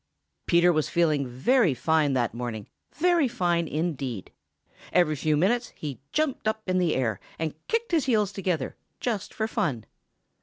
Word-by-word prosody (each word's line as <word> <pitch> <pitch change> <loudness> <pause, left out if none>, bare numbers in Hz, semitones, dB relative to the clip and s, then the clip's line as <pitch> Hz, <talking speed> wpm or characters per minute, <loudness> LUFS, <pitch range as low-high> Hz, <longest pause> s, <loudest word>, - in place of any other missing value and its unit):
Peter 175 +1 +5
was 155 0 0
feeling 155 -5 +2
very 160 - +2
fine 155 +1 +2
that 120 -4 0
morning, 115 -3 -4 0.3
very 345 -3 +3
fine 175 -8 0
indeed. 140 - -3 0.6
Every 155 -4 +3
few 150 +1 +1
minutes 235 +9 +1
he 145 -4 -6
jumped 305 -7 0
up 220 0 -1
in 185 0 +2
the 175 -3 +2
air, 115 -7 0 0.2
and 160 -2 -2
kicked 460 -1 -1
his 325 -4 +2
heels 215 -6 +2
together, 180 -8 -2 0.2
just 215 -5 -2
for 220 - -2
fun. 145 - -1
170 Hz, 155 wpm, -26 LUFS, 140-220 Hz, 0.6 s, Peter